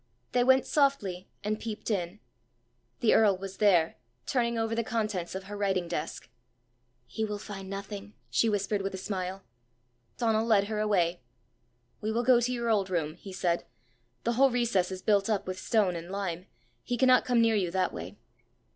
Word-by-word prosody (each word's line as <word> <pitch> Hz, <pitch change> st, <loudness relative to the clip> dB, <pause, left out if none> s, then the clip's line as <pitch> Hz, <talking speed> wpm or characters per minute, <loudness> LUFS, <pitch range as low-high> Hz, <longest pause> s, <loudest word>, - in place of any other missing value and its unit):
They 245 Hz, -, +3 dB
went 260 Hz, +1 st, +5 dB
softly, 240 Hz, -11 st, +1 dB
and 215 Hz, +1 st, -1 dB
peeped 220 Hz, 0 st, -4 dB
in. 185 Hz, 0 st, -2 dB, 0.8 s
The 230 Hz, -, +4 dB
earl 205 Hz, -4 st, +5 dB
was 195 Hz, 0 st, -7 dB
there, 175 Hz, -6 st, +3 dB, 0.3 s
turning 235 Hz, -2 st, 0 dB
over 225 Hz, 0 st, 0 dB
the 230 Hz, +1 st, 0 dB
contents 210 Hz, -6 st, -2 dB
of 190 Hz, -, -4 dB
her 205 Hz, +2 st, -8 dB
writing 190 Hz, -3 st, 0 dB
desk. 165 Hz, -3 st, -4 dB, 0.8 s
"He 220 Hz, -, -4 dB
will 210 Hz, -1 st, -2 dB
find 195 Hz, -2 st, -8 dB
nothing," 200 Hz, +1 st, -7 dB, 0.2 s
she 230 Hz, -, +3 dB
whispered 205 Hz, 0 st, 0 dB
with 195 Hz, 0 st, -3 dB
a -, -, -5 dB
smile. 190 Hz, 0 st, -4 dB, 0.7 s
Donal 225 Hz, -1 st, +1 dB
led 210 Hz, -3 st, +5 dB
her 210 Hz, +1 st, -3 dB
away. 180 Hz, -6 st, +1 dB, 0.8 s
"We 215 Hz, +1 st, -1 dB
will 235 Hz, +2 st, 0 dB
go 245 Hz, -1 st, +5 dB
to 245 Hz, +1 st, 0 dB
your 235 Hz, -2 st, 0 dB
old 200 Hz, -3 st, +1 dB
room," 160 Hz, -4 st, -1 dB
he 190 Hz, +3 st, -11 dB
said. 175 Hz, -2 st, 0 dB, 0.6 s
"The 235 Hz, -, +1 dB
whole 270 Hz, +3 st, +5 dB
recess 235 Hz, -7 st, +1 dB
is 185 Hz, 0 st, -6 dB
built 205 Hz, -1 st, +3 dB
up 210 Hz, -3 st, 0 dB
with 185 Hz, 0 st, -4 dB
stone 205 Hz, -6 st, +2 dB
and 170 Hz, +1 st, -6 dB
lime: 190 Hz, -2 st, -4 dB, 0.3 s
he 245 Hz, -, -2 dB
cannot 255 Hz, 0 st, +5 dB
come 245 Hz, -2 st, +2 dB
near 230 Hz, -1 st, +4 dB
you 190 Hz, -4 st, +1 dB
that 185 Hz, +2 st, 0 dB
way!" -, -, -7 dB
205 Hz, 180 wpm, -29 LUFS, 185-230 Hz, 0.8 s, went